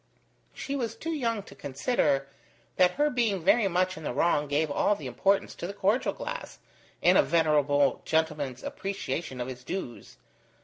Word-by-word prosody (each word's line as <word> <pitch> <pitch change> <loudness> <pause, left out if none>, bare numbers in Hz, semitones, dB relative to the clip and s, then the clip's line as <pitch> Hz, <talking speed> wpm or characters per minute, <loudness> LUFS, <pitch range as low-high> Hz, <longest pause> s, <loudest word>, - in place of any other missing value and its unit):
She 280 - -4
was 230 -5 -2
too 325 +8 -4
young 230 -9 -1
to - - -13
consider 140 - 0 0.5
that 180 0 +5
her 295 +1 +1
being 220 -8 0
very 205 +4 +4
much 185 0 0
in 160 - -9
the 135 - -3
wrong 150 -1 +2
gave 145 +1 0
all 205 +7 +2
the 150 - -9
importance 195 +11 +1
to 170 - -6
the 200 - -7
cordial 205 +5 +1
glass - - -6 0.5
in - - +6
a - - +8
venerable 145 -4 +2
gentleman's 155 -5 -1
appreciation 160 -7 -4
of 125 - -3
his 125 -1 -8
dues. 125 -7 -6
170 Hz, 170 wpm, -28 LUFS, 145-210 Hz, 0.5 s, a